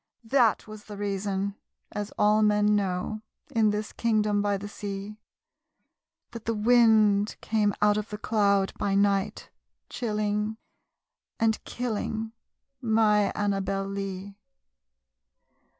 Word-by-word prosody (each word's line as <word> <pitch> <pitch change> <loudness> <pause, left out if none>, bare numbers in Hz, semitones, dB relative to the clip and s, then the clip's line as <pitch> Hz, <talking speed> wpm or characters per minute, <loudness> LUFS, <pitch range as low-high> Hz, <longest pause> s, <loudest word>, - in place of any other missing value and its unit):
that 235 -1 +2
was 215 -1 -10
the 205 -1 -9
reason 200 0 -2 0.4
(as 205 -1 -4
all 210 +1 +4
men 210 0 +3
know, 200 +2 -2 0.3
In 220 -2 +3
this 210 +1 -3
kingdom 215 -3 +1
by 205 -1 +1
the 200 +1 -7
sea) 205 0 -6 1.1
That 230 -2 -9
the 230 - 0
wind 215 -2 +4
came 210 -2 +1
out 210 0 +4
of 210 0 -3
the 210 - -5
cloud 200 -3 +1
by 195 -1 0
night, 200 +1 +1 0.4
Chilling 210 -1 -1 0.8
and 225 -1 +1
killing 225 -2 -3 0.5
my 220 -3 +3
Annabel 195 -1 -1
Lee. 195 0 -5
210 Hz, 115 wpm, -27 LUFS, 200-215 Hz, 1.1 s, all